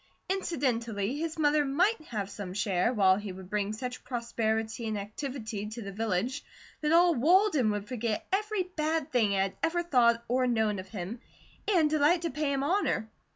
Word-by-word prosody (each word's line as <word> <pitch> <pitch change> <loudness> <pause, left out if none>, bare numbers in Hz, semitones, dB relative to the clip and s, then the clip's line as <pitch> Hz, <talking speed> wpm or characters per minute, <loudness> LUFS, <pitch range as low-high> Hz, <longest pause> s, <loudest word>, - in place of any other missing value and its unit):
Incidentally, 250 - -1
his 325 0 -3
mother 295 -1 +3
might 345 +9 +2
have 210 -4 -3
some 195 -2 -7
share, 200 0 +1
while 190 -5 +4
he 205 -1 -5
would 185 0 -11
bring 205 -1 0
such 250 +3 -5
prosperity 225 -2 -2
and 215 -1 -2
activity 215 0 -5
to 220 +2 -7
the 200 - -6
village 225 +6 -1 0.4
that 300 0 +1
all 345 +1 +6
Walden 315 - +4
would 205 -1 -2
forget 230 -3 -2
every 420 0 +1
bad 320 -4 -2
thing 225 -5 +2
it 195 - +2
had 195 0 -3
ever 345 +1 +1
thought 235 -7 +3
or 255 +1 +2
known 220 -4 +1
of 185 0 -8
him, 200 +4 -6 0.5
and 350 -7 +4
delight 310 +3 +3
to 335 - -1
pay 300 0 -1
him 275 -1 0
honour. 295 - 0
240 Hz, 180 wpm, -29 LUFS, 210-305 Hz, 0.5 s, all